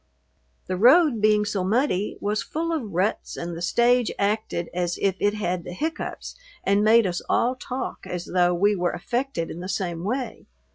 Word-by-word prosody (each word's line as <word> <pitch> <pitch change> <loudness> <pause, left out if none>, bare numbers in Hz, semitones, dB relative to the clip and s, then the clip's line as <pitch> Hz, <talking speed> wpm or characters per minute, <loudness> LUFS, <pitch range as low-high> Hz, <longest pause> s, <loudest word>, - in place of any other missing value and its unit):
The 185 - -3
road, 255 - +5
being 210 0 +4
so 205 -2 -1
muddy, 210 -1 0
was 210 +1 -1
full 330 +2 -3
of 245 -11 -3
ruts 185 +5 -1
and 170 0 -4
the 165 - -7
stage 240 +6 +3
acted 200 -4 -1
as 175 0 -1
if 195 -2 +1
it 205 +1 +1
had 180 -4 -2
the 180 - -7
hiccoughs 320 - -4 0.3
and 200 +1 +2
made 225 +1 +5
us 175 -2 -2
all 250 +2 +2
talk 255 0 -5
as 180 0 -4
though 180 -1 +2
we 205 +4 +3
were 175 -2 0
affected 240 -3 -2
in 170 - -7
the 185 +2 -6
same 175 -3 -2
way. 250 +6 -3
205 Hz, 185 wpm, -24 LUFS, 180-240 Hz, 0.3 s, road